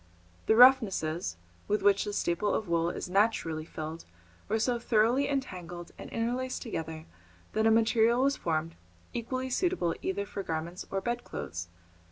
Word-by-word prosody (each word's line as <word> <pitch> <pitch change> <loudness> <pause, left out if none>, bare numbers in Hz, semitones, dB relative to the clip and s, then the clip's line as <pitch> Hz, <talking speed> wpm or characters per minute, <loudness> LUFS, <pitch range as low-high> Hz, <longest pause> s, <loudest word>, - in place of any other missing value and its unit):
The 220 - +5
roughnesses 195 - +5 0.3
with 210 -1 0
which 200 0 +4
the 205 - -4
staple 190 +2 0
of 215 - -2
wool 170 0 +1
is - - -5
naturally 180 -5 +1
filled 160 0 -6 0.4
were 220 - +2
so 240 +2 +1
thoroughly 235 +5 +2
entangled 180 - -4
and - - -9
interlaced 250 +3 -2
together 160 -8 -5 0.5
that 220 +1 +2
a - - +6
material 225 +2 +4
was 280 +1 +3
formed 165 0 -2 0.4
equally 255 +2 -3
suitable 345 - +1
either 200 +1 -2
for 200 - -5
garments 165 0 -4
or 195 - -2
bedclothes. 140 - -4
205 Hz, 150 wpm, -30 LUFS, 170-240 Hz, 0.5 s, a